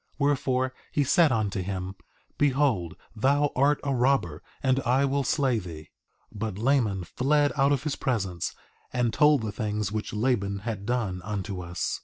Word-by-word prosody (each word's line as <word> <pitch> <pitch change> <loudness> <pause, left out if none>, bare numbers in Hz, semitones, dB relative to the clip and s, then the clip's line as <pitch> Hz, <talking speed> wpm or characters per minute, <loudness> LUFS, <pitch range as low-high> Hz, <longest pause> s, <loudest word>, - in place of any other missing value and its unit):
Wherefore, 130 -2 +1 0.2
he 145 - +2
said 155 +3 +4
unto 105 -4 0
him: 95 0 -4 0.5
Behold 135 - +1 0.2
thou 140 +5 +2
art 140 +3 +3
a 140 -1 0
robber, 120 - +1 0.2
and 130 0 +3
I 130 +2 +2
will 140 +1 0
slay 130 -3 +1
thee. 80 -4 -10 0.4
3:14 105 - -10
But 105 -3 -3
Laman 110 -6 +1
fled 145 - +1
out 140 0 +3
of 140 -1 +1
his 150 -3 -2
presence, 95 -9 -2 0.4
and 125 -2 0
told 150 -4 +4
the 110 - -2
things 105 -2 -2
which 110 0 -3
Laban 105 -4 0
had 105 -3 -4
done, 110 -7 -1
unto 100 -1 -4
us. 85 0 -3
120 Hz, 165 wpm, -27 LUFS, 100-140 Hz, 0.5 s, said